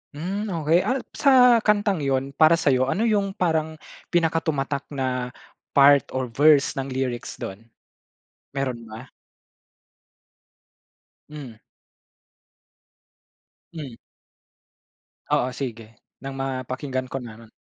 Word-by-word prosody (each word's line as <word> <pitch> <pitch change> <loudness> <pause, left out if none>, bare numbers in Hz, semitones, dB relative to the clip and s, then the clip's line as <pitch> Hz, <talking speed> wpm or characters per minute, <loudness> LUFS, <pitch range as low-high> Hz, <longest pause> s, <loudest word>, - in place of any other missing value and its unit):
Hmm. 195 +8 -3 0.2
Okey, 165 +3 +4
ah 260 +1 0
sa 250 -4 +5
kantang 205 -4 +1
yun 135 -1 -1
para 155 +4 +5
sa 145 -4 +1
'yo, 130 0 +2
ano 195 +11 0
yung 200 -3 +1
parang 160 -3 0 0.3
pinaka-tumatak 160 -5 -1
na 130 -3 -3 0.4
part 140 0 +6
or 130 -2 -2
verse 145 +1 +4
ng 135 - -3
lyrics 130 -2 -3
dun, 105 +4 -8 0.8
meron 130 -4 -3
ba? 115 +3 -10 2.2
Hmm. 140 -7 -9 2.2
Hmm. 140 -8 -8 1.3
Oo 130 - +1
sige, 115 -4 -6 0.3
nang 135 - -5
ma-pakinggan 130 0 -3
ko 135 - -3
naman. 115 -2 -12
140 Hz, 100 wpm, -24 LUFS, 130-165 Hz, 2.2 s, part